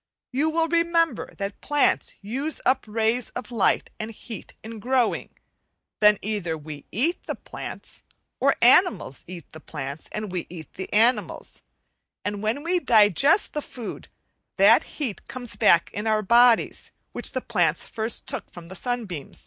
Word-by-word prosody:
You 285 +5 +1
will 325 +1 +1
remember 335 0 +1
that 200 0 -5
plants 290 -1 +1
use 270 +9 -3
up 260 +1 +2
rays 225 +3 0
of 245 0 -6
light 225 -5 +1
and 215 - -4
heat 225 +1 -9
in 220 0 -8
growing; 250 +1 +1 0.7
then 210 -1 +6
either 195 -6 -2
we 150 -1 -10
eat 315 - 0
the - - -3
plants, - - -9 0.4
or - - +3
animals 355 - +4
eat 175 -3 -10
the 160 - -11
plants 145 -1 -7
and 210 -2 -4
we 180 -2 -3
eat 165 -3 -10
the 190 - -7
animals; 230 +4 +1 0.6
and 205 0 -3
when 220 +7 -1
we 355 +2 +1
digest 235 - +4
the 300 - -2
food, 240 -5 -8 0.5
that - - +6
heat 255 -10 -4
comes 245 -1 -6
back 170 0 +4
in 210 +2 -3
our 215 -1 +2
bodies, 235 +3 +4 0.2
which - - -4
the - - 0
plants - - 0
first 220 +1 0
took - - -5
from 170 -1 -11
the 190 - -9
sunbeam. 215 - -3
225 Hz, 155 wpm, -25 LUFS, 195-260 Hz, 0.7 s, then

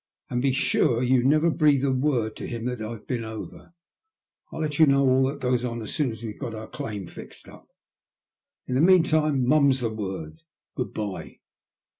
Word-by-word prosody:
'' - - -52
And 120 - 0
be 135 +1 +2
sure 130 -1 +1
you 125 0 +3
never 155 +5 +3
breathe 150 -4 +3
a 135 - +2
word 130 -4 0
to - - -6
him 115 -1 -5
that 125 -2 -3
I've 110 0 -6
been 120 -3 -3
over. 110 +9 -9 0.8
I'll 160 - -5
let 150 -1 -2
you 160 - +7
know 140 0 +4
all 130 +1 +4
that 140 - -4
goes 125 -1 +1
on 120 -1 -3
as 110 - -7
soon 145 -4 0
as 110 +1 -10
we've 110 -2 -7
got 120 -5 -5
our 110 0 -7
claim 105 -3 -6
fixed - - -11
up. - - -15 1.0
In 125 - -4
the 130 - +2
meantime, 155 -6 +3
mum's 140 -2 +4
the 115 -2 -2
word. 95 -7 -6 0.3
Good - - -4
bye." 105 -3 -5
125 Hz, 200 wpm, -25 LUFS, 110-140 Hz, 1.0 s, you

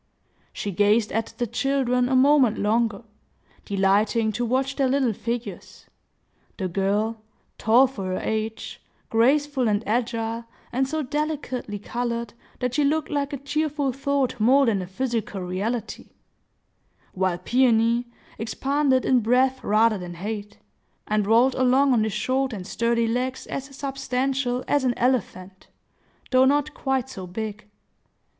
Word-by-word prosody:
She 205 - -4
gazed 210 +3 +2
at 225 0 -1
the 245 - 0
children 250 0 0
a 260 - +2
moment 265 -3 +4
longer, 220 0 0 0.6
delighting 205 +3 +2
to 240 +3 -2
watch 260 +3 0
their 270 -2 +2
little 260 -3 +1
figures,—the 230 -3 -8
girl, 205 +4 -1 0.4
tall 235 +4 +5
for 250 -7 -5
her 185 0 -2
age, 220 0 -4 0.3
graceful 270 +3 +2
and 210 +1 0
agile, 230 0 -1 0.3
and 265 +2 0
so 310 +2 -2
delicately 285 -6 -3
colored 235 +1 -3 0.3
that 250 -1 -1
she 295 - +2
looked 300 +2 0
like 285 0 -1
a 285 - -3
cheerful 290 0 -1
thought 270 -1 -1
more 265 +6 +5
than 210 -5 +1
a 180 - -6
physical 225 -2 -3
reality; 205 +6 -4 1.0
while 185 -2 0
Peony 235 +3 +2 0.3
expanded 265 +4 +1
in 255 - +4
breadth 255 +3 +2
rather 215 0 +3
than 175 -1 -7
height, 205 +3 -6 0.5
and 210 -1 0
rolled 235 +4 +4
along 260 +2 +3
on 225 -3 +3
his 220 - -3
short 255 +4 0
and 190 -4 -6
sturdy 235 +2 0
legs 255 +3 -2
as 270 - -5
substantial 270 -2 -2
as 290 -2 +2
an 250 -2 0
elephant, 195 -7 -2 0.6
though 260 0 +5
not 290 +2 +2
quite 265 -3 -1
so 190 -8 -8
big. 210 +2 -6
240 Hz, 135 wpm, -24 LUFS, 215-265 Hz, 1.0 s, tall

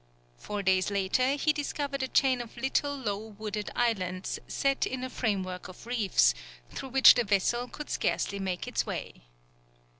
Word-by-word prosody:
Four 205 -1 -4
days 190 0 +2
later 200 +7 +1
he 300 +1 +2
discovered 285 -1 -3
a 260 - 0
chain 260 -2 +3
of 240 0 -10
little 280 +3 0
low 205 -6 -2 0.2
wooded 210 -1 -4
islands 185 -6 -1
set 275 0 0
in 255 -1 -4
a 255 - -4
framework 190 -5 -2
of 185 - -12
reefs, 210 - +3 0.4
through 265 - -6
which 265 +1 +8
the 240 - +1
vessel 220 +4 +1
could 300 +4 -8
scarcely 200 - -1
make 185 -2 -3
its - - 0
way. - - -6
235 Hz, 160 wpm, -29 LUFS, 195-265 Hz, 0.4 s, which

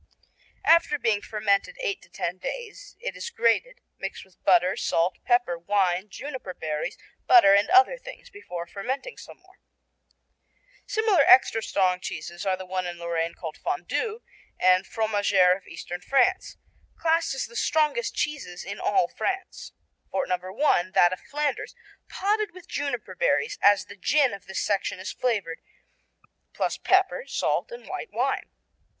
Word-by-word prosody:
After 330 -2 +5
being 225 -6 +1
fermented 210 - 0
eight 445 -5 -2
to - - -19
ten - - -4
days - - -7
it 480 - -5
is 470 - -5
grated, 475 - +1 0.2
mixed - - -6
with 190 -1 -28
butter, 180 0 +4
salt, 170 +2 0
pepper, 240 -9 +2
wine, 190 +1 0
juniper 260 -8 -7
berries, 155 -1 -4 0.3
butter 350 - +8
and 200 +1 +4
other 395 +7 +5
things, - - -11
before 180 - -7
fermenting 255 - -5
some - - -12
more. 375 +1 -25 1.3
Similar 435 -7 +3
extra 225 -3 +6
strong 185 -3 +1
cheeses 175 +2 -6
are 190 -1 +1
the 190 - -8
one 185 0 -3
in 175 0 -6
Lorraine 170 -1 -2
called 160 -3 -7
Fondue 430 +5 -3 0.4
and 185 +1 +4
Fromagère 205 -4 +3
of 195 - -13
eastern 175 0 -7
France, 325 - +1 0.4
classed 330 -3 +1
as - - -2
the 235 - -14
strongest 315 - +1
cheeses 260 -13 -3
in 200 +2 -6
all 190 -4 +2
France. 385 - -4 0.4
Fort 190 - -1
No. 185 +6 -3
I: 295 - +5
That 175 +1 +5
of 185 - -6
Flanders, 300 +11 -3 0.3
potted 415 -1 -1
with 370 0 -13
juniper 280 -4 -3
berries, 465 -4 0
as 205 0 +5
the 200 - -11
gin 275 +5 +2
of 195 -2 -9
this 190 - -3
section 200 -2 -1
is 190 - -5
flavored, 200 -10 -2 0.9
plus - - -1
pepper, 385 +6 +2
salt - - -1
and 480 +1 -9
white - - -6
wine. - - -1
225 Hz, 155 wpm, -26 LUFS, -, 1.3 s, butter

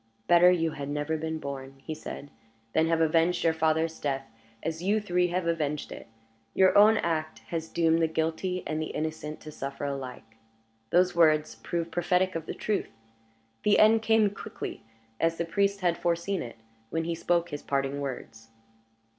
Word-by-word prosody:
"Better 175 +6 +7
you 165 -3 +2
had 140 -1 -6
never 150 +2 -1
been 160 0 -3
born," 135 -2 -6
he 145 +4 -6
said, 145 -2 -8 0.4
"than 160 0 +3
have 165 0 +2
avenged 165 +2 +2
your 165 - +3
father's 160 0 +1
death 135 -2 -2 0.4
as 160 0 -3
you 205 +4 +2
three 180 -3 +1
have 180 0 -1
avenged 150 -3 -1
it. - - -9 0.5
Your 190 -1 +5
own 215 +2 +7
act 155 -3 -1
has 165 -1 -3
doomed 165 0 +2
the 165 - +3
guilty 160 +3 -2
and 155 0 -2
the 155 - -2
innocent 155 0 -4
to 155 - -9
suffer 140 0 -5
alike." 130 -5 -6 0.5
Those 180 0 +3
words 155 -2 +4
proved 170 -1 -4
prophetic 180 +2 +1
of 165 -1 -5
the - - -4
truth. 210 -2 -1 0.7
The 210 - +4
end 220 +1 +6
came 220 -2 +3
quickly, 200 - -7 0.4
as 165 0 +1
the 170 - -1
priest 200 +3 0
had 175 -2 +1
foreseen 170 +2 0
it, 115 -1 -8 0.3
when 165 +4 -1
he 170 +1 -2
spoke 170 +1 0
his 145 -2 -5
parting 140 0 -1
words. 115 -4 -6
165 Hz, 175 wpm, -28 LUFS, 150-175 Hz, 0.7 s, Better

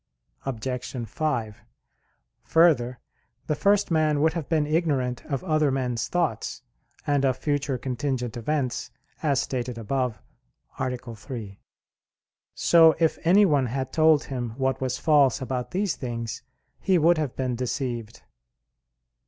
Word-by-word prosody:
Obj. 125 -1 -4
5: 115 -5 -2 0.8
Further, 135 -7 +3 0.5
the - - 0
first 200 +4 +2
man 155 -2 +2
would 160 +2 +3
have 165 -4 -4
been 155 -2 +2
ignorant 145 -6 0
of 140 -4 -3
other 155 -2 +2
men's 125 -3 -1
thoughts, 175 -2 -2 0.4
and 145 -1 +1
of 130 -2 +2
future 145 -2 -1
contingent 125 -1 -3
events, 130 +1 -2 0.3
as 140 -4 +2
stated 125 -3 -3
above 125 0 -2 0.6
(A. - - 0 0.3
3). 110 -4 -8 1.0
So 165 -2 +6
if 160 -2 +2
anyone 165 -7 +4
had 130 +2 -3
told 155 -2 +4
him 120 -4 -5
what 135 0 0
was 130 -1 -1
false 145 -5 +4
about 130 -1 -3
these 195 +1 -1
things, 115 -4 -5 0.4
he 190 -2 +2
would 170 +1 +4
have 145 -5 -2
been 130 -2 -1
deceived. 120 -2 -4
135 Hz, 130 wpm, -25 LUFS, 125-155 Hz, 1.0 s, So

